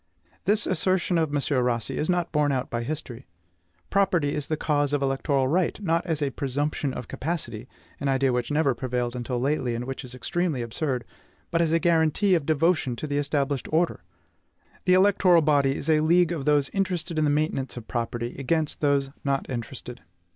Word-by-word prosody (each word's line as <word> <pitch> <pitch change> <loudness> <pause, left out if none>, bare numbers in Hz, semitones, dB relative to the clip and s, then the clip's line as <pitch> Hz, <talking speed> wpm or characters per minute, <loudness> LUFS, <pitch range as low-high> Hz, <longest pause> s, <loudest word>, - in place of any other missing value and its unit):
This 210 +2 +3
assertion 185 0 +1
of 160 -2 +1
M. 140 -3 +1
Rossi 120 -2 -1
is 155 - -1
not 175 -2 0
borne 150 -2 +2
out 130 -1 -2
by 120 - -1
history. 120 -5 -5 0.6
Property 185 -7 +2
is 145 -1 -3
the 155 - -1
cause 145 -2 0
of 145 - +1
the - - +2
electoral 135 0 +1
right, 175 +6 +1
not 170 -4 0
as 155 -3 0
a 140 - 0
PRESUMPTION 140 +2 -2
OF 125 - -6
CAPACITY, 130 -8 -4 0.3
an 140 - -2
idea 135 -1 +2
which 125 -1 -1
never 150 -2 +2
prevailed 125 0 -2
until 125 0 -3
lately, 130 -2 0
and 120 +1 -4
which 135 +2 -5
is 125 -1 -9
extremely 155 0 -1
absurd, 125 +2 -2 0.5
but 170 0 +2
as 165 -2 +1
a 165 - +3
GUARANTEE 170 +3 +3
OF 165 -5 +1
DEVOTION 155 -4 +2
TO 120 - -5
THE 145 -1 -1
ESTABLISHED 140 -1 -1
ORDER. 165 +2 +1 0.8
The 185 0 +5
electoral 185 -3 +5
body 140 -2 +3
is - - -5
a 155 -1 +4
league 170 +2 +3
of 155 -6 -3
those 145 -2 +3
interested 180 -4 -1
in - - +2
the 150 - +3
maintenance 145 -4 -1
of 115 - -8
property, 120 0 -3
against 155 +3 -1
those 140 -2 +2
not 140 -1 -1
interested. 125 - -6
145 Hz, 190 wpm, -26 LUFS, 130-165 Hz, 0.8 s, The